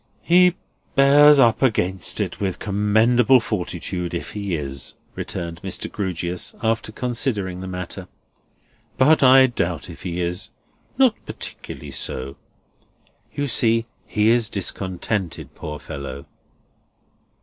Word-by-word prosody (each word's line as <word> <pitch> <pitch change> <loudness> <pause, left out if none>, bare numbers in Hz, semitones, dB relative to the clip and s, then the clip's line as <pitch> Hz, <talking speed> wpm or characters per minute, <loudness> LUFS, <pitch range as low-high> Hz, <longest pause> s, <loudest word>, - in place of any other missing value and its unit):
"He 180 +1 +5 0.4
bears 145 +1 +7
up 115 -5 +4
against 95 - 0
it - - -2
with 95 -3 -2
commendable 110 +5 +3
fortitude 90 -4 -3
if 85 - -5
he 100 -4 -3
is," 70 -3 -5 0.2
returned 85 -1 -5
Mr. - - -4
Grewgious, 90 -3 -3
after 115 0 0
considering 110 -7 -2
the 95 - -6
matter. 90 -1 -6 0.9
"But 150 +4 +5
I 130 0 +8
doubt 90 -9 -2
if 85 - -12
he 90 -1 -4
is. 90 +3 -3 0.5
Not 260 -4 +3
particularly 70 - -7
so. 65 0 -4 1.0
You 145 0 -1
see, 115 -3 +2 0.2
he 105 +1 +2
is 115 -2 +2
discontented, 95 - -3
poor 75 0 -6
fellow." 70 -2 -7
100 Hz, 115 wpm, -22 LUFS, 85-120 Hz, 1.0 s, I